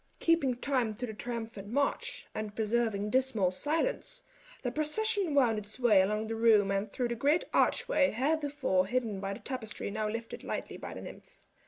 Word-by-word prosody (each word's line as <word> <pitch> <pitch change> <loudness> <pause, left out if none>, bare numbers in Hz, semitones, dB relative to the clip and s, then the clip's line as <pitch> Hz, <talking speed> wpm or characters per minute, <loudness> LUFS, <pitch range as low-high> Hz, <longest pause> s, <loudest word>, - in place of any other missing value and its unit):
Keeping 330 -7 +3
time 245 -4 0
to 245 +4 -4
the 220 - -6
triumphant 225 -2 -5
march, 280 +6 -1
and 215 -1 -4
preserving 220 -2 0
dismal 250 -8 +2
silence, 330 - -2 0.4
the 245 - -1
procession 350 - 0
wound 235 -6 +4
its 210 +1 -8
way 230 -6 +5
along 210 +3 0
the 225 - -3
room 220 -3 +4
and 195 +1 -1
through 245 -2 -1
a 235 - -1
great 290 +8 +2
archway 280 - +3
heretofore 280 -7 +1
hidden 225 -3 -1
by 195 0 -3
the - - -8
tapestry 235 -6 -5
now 215 0 -1
lifted 230 +1 -5
lightly - - -4
by - - -7
the - - -7
nymphs. - - -12
235 Hz, 175 wpm, -31 LUFS, 210-275 Hz, 0.4 s, way